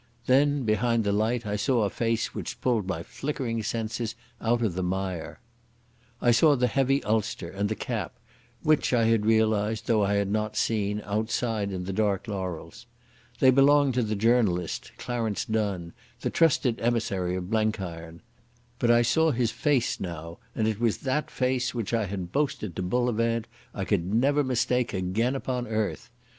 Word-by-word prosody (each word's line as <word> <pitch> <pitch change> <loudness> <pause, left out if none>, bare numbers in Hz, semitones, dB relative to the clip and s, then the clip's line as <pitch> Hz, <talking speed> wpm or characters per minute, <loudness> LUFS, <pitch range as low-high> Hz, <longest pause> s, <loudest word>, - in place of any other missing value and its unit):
Then 140 +1 +3
behind 115 +1 +1
the 100 - +1
light 110 +3 0
I 105 0 -2
saw 115 +3 +1
a 100 - +1
face 115 -1 -1
which - - -5
pulled 115 -6 0
my 85 -3 -3
flickering 130 -4 -3
senses 115 +1 -3 0.3
out 120 +1 +1
of 105 -6 0
the 95 - -2
mire. 95 -1 -3 0.8
I 120 - +3
saw 145 +6 +5
the 125 -1 +2
heavy 135 +3 +1
ulster 110 -4 -1
and 100 +2 -1
the 110 - -1
cap, 115 -3 -4 0.5
which 155 -4 +2
I 120 -2 +4
had 110 -2 +2
realised, 110 -1 +2
though 110 -4 +2
I 100 +1 +1
had 100 -1 0
not 105 0 -1
seen, 105 -2 0
outside 110 0 -1
in 90 -1 -4
the 95 - -3
dark 100 -1 0
laurels. 95 +2 -5 0.5
They 130 - +6
belonged 140 +1 +5
to 125 - +1
the 110 -2 -1
journalist, 105 -6 +1
Clarence 115 -4 -2
Donne, 100 -6 -2 0.3
the - - -1
trusted 140 -7 +2
emissary 100 -6 0
of 90 +2 -5
Blenkiron. 90 -7 -2 0.6
But 120 - +1
I 120 0 +5
saw 160 +7 +3
his 120 -5 +1
face 140 -5 +1
now, 85 -2 -6 0.2
and 110 - +1
it 110 -1 -1
was 115 -3 +1
that 140 +3 -1
face 125 -1 -1
which 115 -2 -3
I 115 -2 +1
had 90 -2 -5
boasted 140 - -1
to - - -3
Bullivant 115 +2 0 0.3
I 100 - -4
could 95 -3 0
never 140 +6 +3
mistake 125 -2 0
again 100 +8 0
upon 125 -2 -3
earth. 110 +1 -2
110 Hz, 170 wpm, -27 LUFS, 100-125 Hz, 0.8 s, They